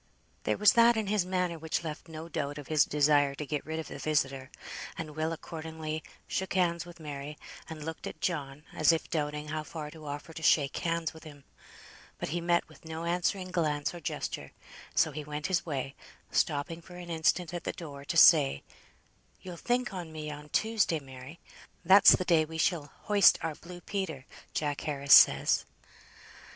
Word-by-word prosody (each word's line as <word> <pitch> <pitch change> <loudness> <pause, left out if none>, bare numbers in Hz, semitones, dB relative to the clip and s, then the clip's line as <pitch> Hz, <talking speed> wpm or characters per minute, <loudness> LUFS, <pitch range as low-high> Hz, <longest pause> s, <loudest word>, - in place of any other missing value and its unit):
There - - +1
was 210 - +6
that 235 0 +6
in 220 - 0
his 200 -2 0
manner 180 -3 -1
which 160 +1 -2
left 155 0 -6
no 160 0 -8
doubt 145 -2 -3
of 145 -3 -9
his 155 -2 +4
desire 145 -1 +3
to 150 - -5
get 150 0 -3
rid 160 0 -3
of 160 - -5
the - - -8
visitor, 135 -3 -1 0.5
and 155 -2 -6
Will 155 +1 -1
accordingly 160 -1 -5 0.2
shook 190 0 -3
hands 170 -2 +1
with 175 0 -12
Mary, 145 -1 -7 0.3
and 155 -2 -7
looked 160 0 -6
at - - -8
John, 145 -4 -3
as 155 +1 +4
if 165 - -2
doubting 150 -1 -2
how 155 0 -2
far 155 -1 -7
to 155 -1 -11
offer 145 +3 -6
to 160 - -8
shake 145 -3 +3
hands 165 -1 -1
with 160 - -13
him. 145 -3 -12 0.7
But - - -4
he 170 +3 -2
met 170 0 +1
with - - -18
no 160 0 -6
answering 180 +2 -1
glance 150 -4 0
or 175 - -7
gesture, 165 - -5 0.4
so - - +3
he 155 - -6
went 150 0 -5
his 185 -2 0
way, 135 -3 -3 0.4
stopping 155 +2 0
for 180 +1 -13
an 175 -1 -8
instant 165 +1 +1
at 175 -1 -4
the - - -2
door 145 -5 -9
to - - -2
say, 70 +1 +6 0.8
"You'll 180 -2 -7
think 245 +4 -1
on 175 -4 -6
me 155 -1 -6
on 150 0 -9
Tuesday, 220 -5 +1
Mary. 135 +3 -11 0.5
That's 195 +3 +8
the 185 - -3
day 165 -3 +4
we 160 +1 -7
shall 160 -4 0
hoist 205 -1 +6
our 165 -1 -1
blue 175 +3 -11
Peter, 175 -11 -4 0.3
Jack 145 -2 -1
Harris 140 -2 +2
says." - - +6
160 Hz, 190 wpm, -30 LUFS, 150-175 Hz, 0.8 s, That's